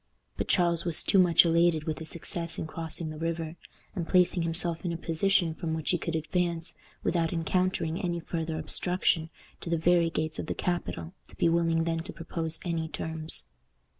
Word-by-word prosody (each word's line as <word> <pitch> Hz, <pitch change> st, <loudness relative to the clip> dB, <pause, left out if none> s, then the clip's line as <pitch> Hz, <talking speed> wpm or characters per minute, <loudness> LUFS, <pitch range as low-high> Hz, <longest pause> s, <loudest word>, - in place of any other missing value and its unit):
But -, -, -3 dB
Charles 170 Hz, -3 st, +2 dB
was 170 Hz, -2 st, +1 dB
too 195 Hz, -, +4 dB
much 175 Hz, -1 st, +6 dB
elated 165 Hz, -1 st, +3 dB
with 155 Hz, -1 st, -3 dB
his 160 Hz, -1 st, -2 dB
success 170 Hz, 0 st, -2 dB
in -, -, -3 dB
crossing 160 Hz, 0 st, -4 dB
the 155 Hz, -, -8 dB
river, 165 Hz, -1 st, -2 dB, 0.4 s
and 170 Hz, -4 st, -3 dB
placing 180 Hz, -1 st, +4 dB
himself 165 Hz, 0 st, +1 dB
in 175 Hz, -, -1 dB
a 170 Hz, -, -3 dB
position 170 Hz, +1 st, +2 dB
from 160 Hz, 0 st, -3 dB
which 160 Hz, -2 st, -1 dB
he 175 Hz, -, +1 dB
could 165 Hz, -, -3 dB
advance, 170 Hz, +1 st, -1 dB, 0.3 s
without 165 Hz, -2 st, +1 dB
encountering 175 Hz, 0 st, 0 dB
any 175 Hz, -3 st, -1 dB
farther 165 Hz, -1 st, -3 dB
obstruction, 175 Hz, -2 st, +1 dB, 0.3 s
to -, -, -6 dB
the 170 Hz, -, +2 dB
very 170 Hz, +1 st, +3 dB
gates 155 Hz, -1 st, -2 dB
of -, -, -4 dB
the -, -, -2 dB
capital, 175 Hz, -1 st, -3 dB
to -, -, -11 dB
be 170 Hz, -, +3 dB
willing 165 Hz, -1 st, +2 dB
then 165 Hz, 0 st, -1 dB
to 165 Hz, -, -7 dB
propose 165 Hz, -1 st, -2 dB
any 165 Hz, -2 st, -1 dB
terms. 160 Hz, 0 st, -3 dB
165 Hz, 190 wpm, -29 LUFS, 160-175 Hz, 0.4 s, much